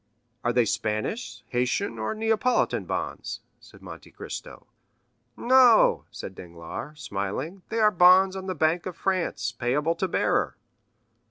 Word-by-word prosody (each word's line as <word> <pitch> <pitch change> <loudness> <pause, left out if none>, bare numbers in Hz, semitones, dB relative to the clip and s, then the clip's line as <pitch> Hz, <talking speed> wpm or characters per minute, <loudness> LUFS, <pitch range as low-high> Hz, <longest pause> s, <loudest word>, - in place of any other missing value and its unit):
"Are 120 - +1
they 120 -1 +3
Spanish, 115 - -3
Haitian, 120 -2 -1
or 110 - -2
Neapolitan 225 +3 +1
bonds?" - - -4 0.2
said - - -18
Monte - - -11
Cristo. - - -9 0.7
"No," 250 -2 +5
said - - -8
Danglars, 85 - -9
smiling, 105 - -4
"they 225 - -3
are 215 -1 +4
bonds 185 +1 +6
on 190 0 -6
the 185 - -2
bank 160 +3 +1
of 180 - -7
France, 185 - -1
payable 130 +8 0
to 180 +3 -2
bearer. - - 0
170 Hz, 135 wpm, -26 LUFS, 120-195 Hz, 0.7 s, bonds